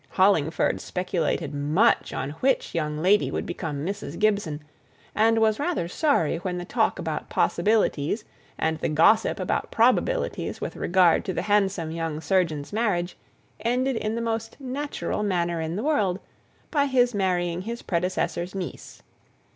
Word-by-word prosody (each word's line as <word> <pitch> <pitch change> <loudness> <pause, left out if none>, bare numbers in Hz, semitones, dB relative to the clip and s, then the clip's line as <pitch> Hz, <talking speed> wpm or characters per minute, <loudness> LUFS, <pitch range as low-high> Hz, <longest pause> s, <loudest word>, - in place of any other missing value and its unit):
Hollingford 175 -5 +2
speculated 170 -4 -2
much 150 +11 +2
on 135 - -3
which 265 0 +1
young 150 -2 -1
lady 205 +3 +4
would - - -3
become 150 -4 -4
Mrs. 195 -4 -5
Gibson, 200 -8 0 0.5
and 225 +1 +3
was 220 -1 +3
rather 300 - -1
sorry 180 - +1
when 180 0 -3
the 175 - -5
talk - - +1
about - - -4
possibilities, 210 -2 +1 0.3
and 160 0 0
the - - -1
gossip 165 +9 +4
about - - -1
probabilities, - - +1
with - - -5
regard 175 -2 +3
to 190 - -2
the - - -2
handsome 195 -5 +1
young 165 -2 -3
surgeon's 160 -2 0
marriage, 200 -6 0 0.4
ended 250 +3 0
in 220 0 -2
the 235 - -2
most 225 +1 -3
natural 275 -3 -3
manner 175 -4 0
in 160 +1 -3
the 210 - -3
world, 205 -12 +1 0.5
by 285 -3 +2
his 250 -2 +3
marrying 180 -3 0
his 235 +4 -6
predecessor's 180 0 -1
niece. 185 -3 -7
190 Hz, 145 wpm, -25 LUFS, 165-225 Hz, 0.5 s, lady